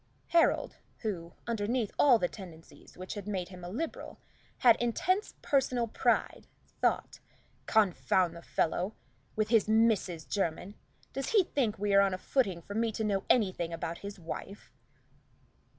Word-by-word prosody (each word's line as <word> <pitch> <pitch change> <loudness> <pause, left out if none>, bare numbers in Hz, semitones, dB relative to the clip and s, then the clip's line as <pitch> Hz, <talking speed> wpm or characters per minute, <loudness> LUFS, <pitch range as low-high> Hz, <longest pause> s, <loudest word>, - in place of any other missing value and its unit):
Harold, 335 -1 +2 0.2
who, 175 -6 -4
underneath 230 0 -1
all 260 -5 +7
the 180 - 0
tendencies 170 -5 -13
which 185 +1 -6
had 205 -2 -7
made 185 -4 -3
him 180 -2 -11
a 175 - -6
Liberal, 290 - -5 0.4
had 235 -3 +6
intense 365 - 0
personal 255 -4 +1
pride, - - 0 0.3
thought, - - 0 0.5
"Confound 180 - +2
the 170 - -9
fellow 175 +5 -1 0.4
with 215 0 0
his 225 -3 +4
Mrs. 215 -7 +2
Jermyn! 190 0 -2 0.4
Does 270 0 -3
he 415 -4 +6
think 245 -10 -1
we 205 0 0
are 200 - +7
on 195 -1 +2
a - - -6
footing 190 -6 0
for 200 - -8
me 225 +1 0
to 220 - -3
know 200 -2 0
anything 185 -7 +2
about 165 0 -4
his 200 0 -7
wife?" 185 +3 -8
205 Hz, 150 wpm, -31 LUFS, 180-230 Hz, 0.5 s, all